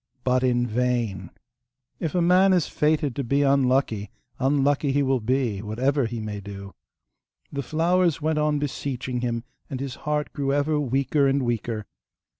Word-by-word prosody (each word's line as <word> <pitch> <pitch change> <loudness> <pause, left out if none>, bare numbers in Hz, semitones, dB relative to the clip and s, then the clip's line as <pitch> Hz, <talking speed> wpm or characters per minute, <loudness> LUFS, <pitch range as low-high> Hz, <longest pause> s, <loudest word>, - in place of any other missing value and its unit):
But 130 0 +2
in 120 -1 +2
vain! 115 -6 -1 0.7
If 165 0 -3
a 175 - +3
man 185 +2 +5
is 175 -4 +2
fated 150 -4 +1
to 140 - -2
be 140 +4 +1
unlucky, 130 -6 +2 0.3
unlucky 140 +1 +2
he 140 +1 +2
will 135 -1 +2
be, 120 -3 0
whatever 125 +5 0
he 115 0 -5
may 105 -1 -5
do! 100 0 -9 0.8
The 140 - -2
flowers 170 +4 +1
went 155 0 0
on 150 0 +2
beseeching 130 -3 -3
him, 115 -2 -2 0.3
and 135 -3 -4
his 135 -2 -4 0.2
heart 150 0 -1
grew 140 -1 -1
ever 145 +1 +1
weaker 140 +1 +1
and 135 0 +1
weaker. 115 -2 -2
135 Hz, 160 wpm, -25 LUFS, 120-145 Hz, 0.8 s, man